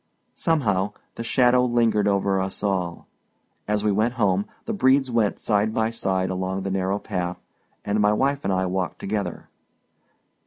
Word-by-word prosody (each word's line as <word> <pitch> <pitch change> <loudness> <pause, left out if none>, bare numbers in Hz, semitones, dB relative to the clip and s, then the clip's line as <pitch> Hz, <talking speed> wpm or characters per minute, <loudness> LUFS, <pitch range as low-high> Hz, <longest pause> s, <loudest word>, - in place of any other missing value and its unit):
Somehow, 105 - 0 0.2
the 115 - -6
shadow 125 +1 +4
lingered 115 -4 +2
over 100 -1 +1
us 95 +2 -4
all. 90 -4 -1 0.6
As 105 0 0
we 105 - +2
went 110 +5 +1
home, 100 -4 +1 0.2
the 225 - -2
Bredes 135 - +3
went 115 -3 +1
side 105 0 0
by 110 0 +1
side 95 -4 -1
along 95 +1 -2
the 95 - -2
narrow 95 +1 0
path, 90 -4 -3 0.5
and 100 +1 0
my 105 0 +4
wife 140 +6 +1
and 95 - 0
I 95 0 +1
walked 90 0 -2
together. 100 -3 -4
105 Hz, 160 wpm, -24 LUFS, 95-115 Hz, 0.6 s, shadow